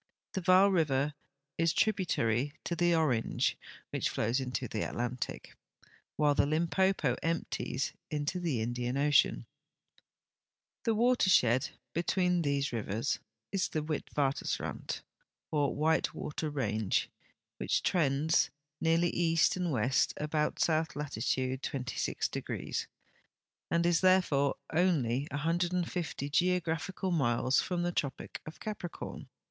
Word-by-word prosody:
The 190 - -2
Vaal 185 +2 +6
river 150 -5 +2 0.5
is 165 -1 +3
tributary 145 - +1
to 170 - -2
the 175 0 +3
Orange, 135 -9 +1 0.4
which - - 0
flows 115 +4 0
into 130 -1 -3
the 110 - -3
Atlantic, 120 +1 -4 0.6
Avhile 145 -1 +4
the 140 - +3
Limpopo 165 -2 +2
emp 165 0 -1
ties 130 - -2 0.2
into 150 +4 -2
the 155 -10 -1
Indian 120 +2 -2
ocean. 140 - +3 1.4
The 225 - +2
watershed 190 - +4 0.2
between 180 +1 +1
these 140 -3 0
rivers 115 +3 -1 0.3
is 195 -3 0
the 155 - -2
Witwatersrand, 145 -2 -2 0.5
or 145 -2 +1
white 160 +2 +1
water 150 +1 -3
range, 110 -8 0 0.5
which - - 0
trends 155 -2 +2 0.3
nearl}^ 165 +1 +3
east 165 -2 +3
and 180 -2 -1
west 125 0 +2
about 150 0 -1
south 160 -1 +1
latitude 130 -2 -1
26°, 130 -3 -3 0.8
and 170 0 +2
is 170 -1 +3
therefore 180 -7 +3 0.2
onl}' 145 -7 +2
150 170 0 -1
geographical 180 +2 0
miles 130 -4 +2
from 175 -1 -2
the 175 - 0
tropic 140 -6 -3
of 155 - -9
Capricorn. 205 -5 -6
150 Hz, 115 wpm, -31 LUFS, 130-175 Hz, 1.4 s, Vaal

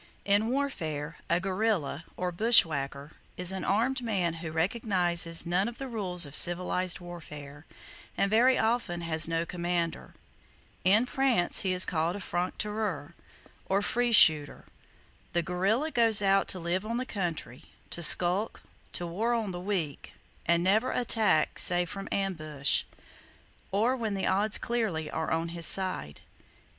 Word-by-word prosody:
In 205 +2 +2
warfare, 165 - -3
a 170 - +2
guerrilla, 185 -5 -2
or 180 0 -2
bushwhacker, 155 - +2 0.3
is 180 0 -1
an 190 - -5
armed 245 +6 0
man 195 -8 -1
who 165 -2 -5
recognizes 175 -2 0
none 180 +5 0
of 235 - -7
the 270 - -6
rules 185 -8 -1
of 140 +1 -9
civilized 180 +1 +2
warfare, 150 -4 -11 0.5
and 195 - +1
very 250 +4 +4
often 220 -6 -1
has 160 -1 +1
no 165 0 -1
commander. 175 -1 -3 0.7
In 210 +6 +4
France 250 -8 +1
he 190 - -1
is 180 0 +4
called 165 +1 -1
a - - -6
"franc 180 -1 -3
tireur," 210 -8 -4 0.5
or 195 +1 +1
free 240 +3 0
shooter. 155 -9 +5 0.7
The 170 - +1
guerrilla 200 - 0
goes 225 -5 +4
out 195 0 +3
to 185 - -1
live 175 +3 -2
on 230 +2 -3
the 255 - -3
country, 170 - -5 0.3
to 170 - -2
skulk, 180 +5 +3 0.3
to 175 - 0
war 215 +8 -1
on 220 -4 -2
the 175 0 -6
weak, 180 -7 -4 0.3
and 170 +1 +2
never 215 +7 +2
attack 220 -10 +1
save 175 0 +3
from 195 -1 -7
ambush, 155 -8 -1 0.9
or 225 +6 +1
when 220 -5 -3
the 195 - -2
odds 205 +2 +3
clearly 210 -10 -2
are 160 - -3
on 165 +1 -1
his 170 0 -1
side. 185 - -1
185 Hz, 150 wpm, -28 LUFS, 165-215 Hz, 0.9 s, shooter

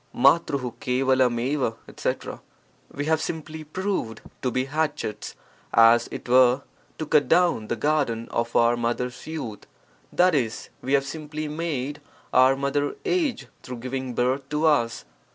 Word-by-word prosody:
TfTg: 130 -2 +2
%3cTW 130 -1 +2
etc. - - -4 0.3
— - - -33
We 145 - -1
have 160 0 +2
simply 160 -1 -5
proved 155 - -3 0.2
to 130 - 0
be 130 +2 0
hatchets, 145 -7 -3 0.4
as 115 +1 +6
it - - -7
were, 125 +2 +5 0.3
to 155 - -3
cut 145 -2 +3
down 170 -8 +3
the 120 - -1
garden 120 -3 0
of 115 0 -2
our 120 0 +4
mother's 120 +2 -3
youth, 135 -10 -6 0.5
i.e., 150 -11 +4 0.3
we 135 - -2
have 140 -1 +3
simply 155 +1 -5
made 150 -2 -3 0.3
our 130 +1 +6
mother 140 +1 -1
age 350 - 0 0.2
through 125 -1 -7
giving 130 +1 -4
birth 130 +2 0
to 150 +2 0
us. 120 -7 +2
135 Hz, 140 wpm, -25 LUFS, 120-155 Hz, 0.5 s, as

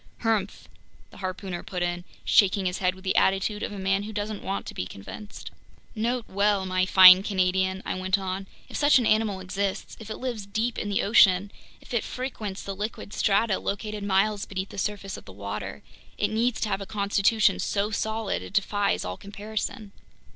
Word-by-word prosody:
"Humph!" 220 -4 -1 0.4
the - - -14
harpooner 185 -1 -4
put 180 -2 -4
in, 175 0 -2 0.2
shaking 195 -1 +4
his 180 0 -1
head 185 -1 +1
with 190 - -15
the 190 - 0
attitude 195 +2 +2
of - - -3
a 205 - -7
man 195 +1 +1
who 210 +2 -6
doesn't 210 0 -4
want 195 +1 -3
to - - -7
be 90 - -4
convinced. 205 - -9 0.4
"Note 235 +2 -1
well, 200 0 +1
my 185 0 +1
fine 185 -1 +10
Canadian," 190 -1 0
I - - -1
went 185 +1 +1
on, 190 0 -4 0.2
"if - - -10
such 290 -1 +5
an 245 - +1
animal 215 -3 +2
exists, 195 +1 -3
if 220 -1 -10
it 215 - -5
lives 235 -6 -4
deep 220 +4 -1
in 205 - -3
the 200 - +1
ocean, 200 -2 +5 0.3
if - - -12
it 235 - +1
frequents 220 -6 -5
the 195 - -5
liquid 210 0 -5
strata 205 0 +2
located 210 +1 -4
miles 200 +1 +1
beneath 190 0 -4
the - - -7
surface 200 -1 -3
of - - -13
the - - -11
water, 100 +2 -6 0.3
it - - +1
needs 230 +2 +1
to 215 - 0
have 195 0 -1
a 195 - -6
constitution 205 +1 +2
so 205 +1 -1
solid, 220 0 -2
it - - -10
defies 205 0 +1
all 90 +1 -4
comparison." 210 +2 -5
200 Hz, 195 wpm, -26 LUFS, 190-215 Hz, 0.4 s, fine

